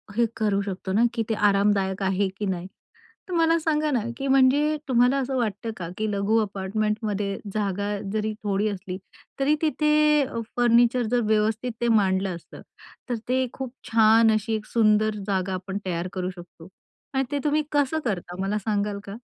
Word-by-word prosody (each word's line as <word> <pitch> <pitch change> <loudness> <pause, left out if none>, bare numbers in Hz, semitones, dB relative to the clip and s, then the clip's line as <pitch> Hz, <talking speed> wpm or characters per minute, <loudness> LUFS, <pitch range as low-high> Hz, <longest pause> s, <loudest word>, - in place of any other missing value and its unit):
हे 235 - +3
करू 205 -2 +1
शकतो 190 -1 -5
ना, 220 +4 +3
की 230 -1 -1
ते - - +2
आरामदायक 200 -2 +2
आहे 195 +1 +1
की 210 - -3
नाही? 185 -2 -3 0.6
तर 370 - -6
मला 330 -1 +3
सांगा 305 -1 0
ना, 255 - +2 0.2
की 275 - -3
म्हणजे 275 +3 +4
तुम्हाला 250 +1 +3
असं 265 -1 -1
वाटतं 225 -1 -2
का 170 -2 -5
की 215 -1 -1
लघु 200 +2 +1
अपार्टमेंटमध्ये 205 0 -2 0.2
जागा 205 -1 -1 0.2
जरी 215 0 -1
थोडी 205 0 0
असली, 185 -2 -5 0.4
तरी 280 +3 +3
तिथे 300 -1 +3
अ, 230 - -5 0.2
फर्निचर 240 +1 +4
जर 245 - +3
व्यवस्थित 220 +3 +1
ते 240 - +1
मांडलं 195 -4 +2
असतं, 170 - -12 0.5
तर 245 - 0
ते 260 +1 +2
खूप 260 -2 -6 0.2
छान 225 0 +6
अशी 215 +1 0
एक 215 -1 -5
सुंदर 215 -1 +2
जागा 190 -1 -1
आपण 190 +1 -4
तयार 175 -1 -2
करू 185 -1 -2
शकतो. 170 -1 -13 0.5
आणि 265 - +2
ते 285 - 0
तुम्ही 300 0 +2
कसं 290 +1 +1
करता, 180 -5 -3
मला 195 +2 0
सांगाल 205 -1 -1
का? 200 0 -8
215 Hz, 175 wpm, -25 LUFS, 195-250 Hz, 0.6 s, छान